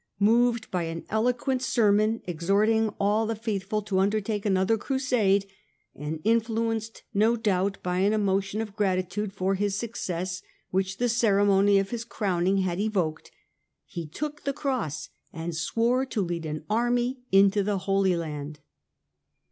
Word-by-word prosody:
Moved 235 Hz, +2 st, +3 dB
by 180 Hz, -2 st, -1 dB
an 165 Hz, 0 st, -5 dB
eloquent 250 Hz, +4 st, 0 dB
sermon 215 Hz, -3 st, +2 dB
exhorting 200 Hz, +6 st, +2 dB
all 210 Hz, +2 st, +2 dB
the 225 Hz, -, -1 dB
faithful 210 Hz, -1 st, -2 dB
to 195 Hz, -2 st, 0 dB
undertake 210 Hz, +1 st, 0 dB
another 190 Hz, +2 st, +2 dB
Crusade, 225 Hz, -6 st, +1 dB, 0.5 s
and 150 Hz, +2 st, -5 dB
influenced 225 Hz, 0 st, 0 dB
no 220 Hz, +3 st, +3 dB
doubt 200 Hz, -3 st, 0 dB
by 180 Hz, 0 st, -1 dB
an 200 Hz, +2 st, +3 dB
emotion 200 Hz, 0 st, 0 dB
of 210 Hz, -3 st, -6 dB
gratitude 195 Hz, 0 st, -1 dB
for 195 Hz, 0 st, -1 dB
his 200 Hz, 0 st, 0 dB
success 185 Hz, -5 st, -3 dB, 0.3 s
which 190 Hz, +1 st, -1 dB
the 245 Hz, -, +1 dB
ceremony 205 Hz, -3 st, +4 dB
of 195 Hz, 0 st, 0 dB
his 235 Hz, -1 st, -3 dB
crowning 195 Hz, -4 st, 0 dB
had 180 Hz, -1 st, -2 dB
evoked, 185 Hz, -7 st, -1 dB, 0.6 s
he 170 Hz, -2 st, -6 dB
took 295 Hz, -, -5 dB
the 280 Hz, -, -1 dB
Cross 255 Hz, -, -3 dB, 0.2 s
and 165 Hz, 0 st, -5 dB
swore 230 Hz, +10 st, +1 dB
to 240 Hz, -, -3 dB
lead 170 Hz, -2 st, -3 dB
an 155 Hz, 0 st, -5 dB
army 240 Hz, +3 st, +1 dB
into 195 Hz, +1 st, +5 dB
the 200 Hz, 0 st, 0 dB
Holy 195 Hz, -1 st, +1 dB
Land. 150 Hz, -3 st, -5 dB
205 Hz, 145 wpm, -27 LUFS, 185-225 Hz, 0.6 s, into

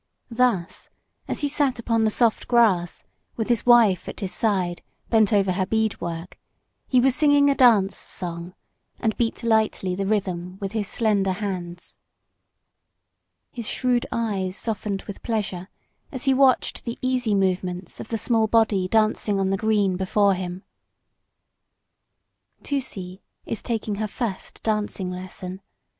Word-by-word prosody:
Thus 230 Hz, -7 st, 0 dB, 0.4 s
as -, -, -3 dB
he 290 Hz, -, +1 dB
sat 285 Hz, -3 st, 0 dB
upon 230 Hz, -1 st, +1 dB
the -, -, +3 dB
soft 230 Hz, +1 st, +1 dB
grass, 205 Hz, -8 st, +2 dB, 0.3 s
with 225 Hz, 0 st, -3 dB
his 240 Hz, 0 st, +1 dB
wife 230 Hz, -7 st, +5 dB
at -, -, -8 dB
his 195 Hz, -3 st, -4 dB
side, 185 Hz, -6 st, 0 dB, 0.3 s
bent 220 Hz, -3 st, +4 dB
over 200 Hz, -3 st, +3 dB
her 185 Hz, 0 st, -1 dB
bead 220 Hz, 0 st, 0 dB
work, 170 Hz, +1 st, -6 dB, 0.5 s
he 255 Hz, -, +3 dB
was 260 Hz, +1 st, +4 dB
singing 285 Hz, -1 st, +4 dB
a -, -, +3 dB
dance 215 Hz, -7 st, +4 dB
song, 175 Hz, 0 st, -5 dB, 0.4 s
and 220 Hz, -2 st, 0 dB
beat 235 Hz, 0 st, -1 dB
lightly 220 Hz, -5 st, +1 dB
the 195 Hz, +1 st, -2 dB
rhythm 185 Hz, -3 st, -2 dB
with 195 Hz, -1 st, -4 dB
his 215 Hz, -2 st, -2 dB
slender 200 Hz, -3 st, +1 dB
hands. 180 Hz, -3 st, -6 dB, 1.5 s
His 235 Hz, -4 st, -4 dB
shrewd 250 Hz, -2 st, 0 dB
eyes 200 Hz, -4 st, -2 dB
softened 210 Hz, -3 st, -3 dB
with 200 Hz, -, -9 dB
pleasure 195 Hz, -5 st, -3 dB, 0.4 s
as 260 Hz, -3 st, -5 dB
he 270 Hz, -1 st, +3 dB
watched 265 Hz, -1 st, +2 dB
the 235 Hz, -1 st, -5 dB
easy 250 Hz, -4 st, +1 dB
movements 185 Hz, -2 st, -1 dB
of -, -, -7 dB
the 225 Hz, -, -2 dB
small 225 Hz, 0 st, +2 dB
body 210 Hz, -4 st, +2 dB
dancing 215 Hz, -1 st, +1 dB
on 190 Hz, 0 st, +1 dB
the -, -, +2 dB
green 205 Hz, -3 st, +1 dB
before 200 Hz, +1 st, +2 dB
him. 180 Hz, 0 st, -5 dB, 2.0 s
Tusee 195 Hz, -10 st, -3 dB, 0.2 s
is 225 Hz, -, -4 dB
taking 225 Hz, -3 st, -2 dB
her 215 Hz, +1 st, -1 dB
first 215 Hz, -3 st, -5 dB
dancing 210 Hz, -4 st, -1 dB
lesson. 185 Hz, +1 st, -6 dB
210 Hz, 145 wpm, -24 LUFS, 185-230 Hz, 2.0 s, wife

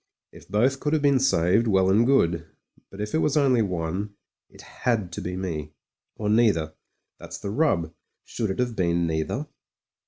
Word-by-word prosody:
If -, -, -15 dB
both 125 Hz, +7 st, +2 dB
could 150 Hz, +2 st, -1 dB
have 155 Hz, -2 st, +1 dB
been 140 Hz, -2 st, +4 dB
saved, 105 Hz, -2 st, +2 dB
well 95 Hz, -2 st, +3 dB
and 115 Hz, +5 st, +4 dB
good; 85 Hz, -11 st, +2 dB, 0.4 s
but 95 Hz, -, -12 dB
if 105 Hz, 0 st, -4 dB
it 160 Hz, -, +2 dB
was 150 Hz, -1 st, +1 dB
only 130 Hz, -5 st, +3 dB
one, 95 Hz, +1 st, -3 dB, 0.3 s
it -, -, -15 dB
had 110 Hz, -7 st, -2 dB
to -, -, -6 dB
be 90 Hz, +1 st, -4 dB
me, 75 Hz, -5 st, -5 dB, 0.4 s
or 105 Hz, -, -4 dB
neither. 105 Hz, -8 st, +2 dB, 0.5 s
That's -, -, -8 dB
the 100 Hz, -, -5 dB
rub; 105 Hz, -, +1 dB, 0.3 s
should 110 Hz, -3 st, -3 dB
it 95 Hz, -, -3 dB
have 125 Hz, -2 st, -1 dB
been 85 Hz, -2 st, +1 dB
neither 80 Hz, -, -2 dB
100 Hz, 180 wpm, -25 LUFS, 85-125 Hz, 0.5 s, been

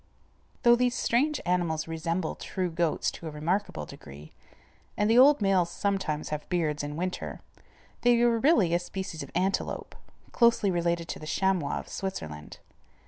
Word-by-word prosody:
Though 240 Hz, 0 st, +7 dB
these 250 Hz, 0 st, +1 dB
strange 285 Hz, +5 st, +1 dB
animals 175 Hz, -3 st, 0 dB
resemble 165 Hz, +1 st, -2 dB
true 185 Hz, -2 st, -3 dB
goats 165 Hz, -1 st, 0 dB
to 165 Hz, -, -9 dB
a -, -, -3 dB
remarkable 155 Hz, -, -2 dB
degree, 75 Hz, +2 st, -12 dB, 0.7 s
and 210 Hz, -, +2 dB
the 230 Hz, +3 st, +5 dB
old 275 Hz, -3 st, +6 dB
males 190 Hz, -3 st, +3 dB
sometimes 190 Hz, -6 st, -2 dB
have 150 Hz, 0 st, -5 dB
beards 160 Hz, -4 st, 0 dB
in 145 Hz, 0 st, -5 dB
winter, 180 Hz, +3 st, -4 dB, 0.6 s
they 240 Hz, -1 st, +4 dB
are 235 Hz, -1 st, +3 dB
really 220 Hz, -, +4 dB
a 175 Hz, -, +3 dB
species 180 Hz, -2 st, -6 dB
of -, -, -7 dB
antelope, 190 Hz, +2 st, -1 dB, 0.4 s
closely 230 Hz, -4 st, +3 dB
related 170 Hz, -1 st, 0 dB
to -, -, -4 dB
the 155 Hz, -, -9 dB
chamois 185 Hz, -3 st, 0 dB
of -, -, -7 dB
Switzerland. 80 Hz, -, -6 dB
180 Hz, 155 wpm, -28 LUFS, 160-205 Hz, 0.7 s, Though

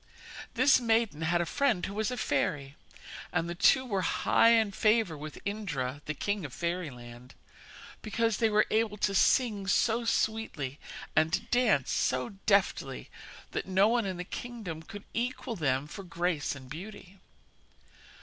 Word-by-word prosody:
This 285 Hz, -3 st, +5 dB
maiden 225 Hz, -8 st, +1 dB
had 170 Hz, +2 st, +1 dB
a -, -, 0 dB
friend 220 Hz, -, +1 dB
who 195 Hz, -, -5 dB
was 215 Hz, +1 st, -1 dB
a 250 Hz, -, -4 dB
fairy, 140 Hz, -, -1 dB, 0.6 s
and 165 Hz, -, 0 dB
the 170 Hz, -, -3 dB
two 260 Hz, +9 st, +4 dB
were 200 Hz, -6 st, -1 dB
high 230 Hz, +4 st, +3 dB
in 225 Hz, -3 st, +4 dB
favour 215 Hz, -3 st, +2 dB
with 150 Hz, +1 st, -8 dB
Indra, 150 Hz, -10 st, -3 dB
the 150 Hz, -, -3 dB
king 205 Hz, +4 st, -2 dB
of 140 Hz, -4 st, -7 dB
fairyland, 125 Hz, -9 st, -5 dB, 0.7 s
because 225 Hz, 0 st, 0 dB
they 225 Hz, -, +2 dB
were 215 Hz, 0 st, +4 dB
able 220 Hz, -1 st, +1 dB
to 200 Hz, 0 st, 0 dB
sing 205 Hz, -1 st, +2 dB
so 225 Hz, +4 st, +2 dB
sweetly 220 Hz, -, -1 dB, 0.4 s
and 160 Hz, +2 st, +2 dB
dance 225 Hz, -, +3 dB
so 130 Hz, -1 st, 0 dB, 0.2 s
deftly 200 Hz, -2 st, +1 dB, 0.4 s
that -, -, -3 dB
no 190 Hz, +2 st, +4 dB
one 235 Hz, -3 st, +1 dB
in 185 Hz, -2 st, -3 dB
the 180 Hz, -, -4 dB
kingdom 205 Hz, -6 st, -6 dB
could 205 Hz, +4 st, -10 dB
equal 250 Hz, 0 st, -2 dB
them 135 Hz, -6 st, 0 dB
for 155 Hz, -, -8 dB
grace 175 Hz, -4 st, -1 dB
and 130 Hz, -2 st, -11 dB
beauty. 190 Hz, +5 st, -10 dB
195 Hz, 155 wpm, -30 LUFS, 155-225 Hz, 0.7 s, This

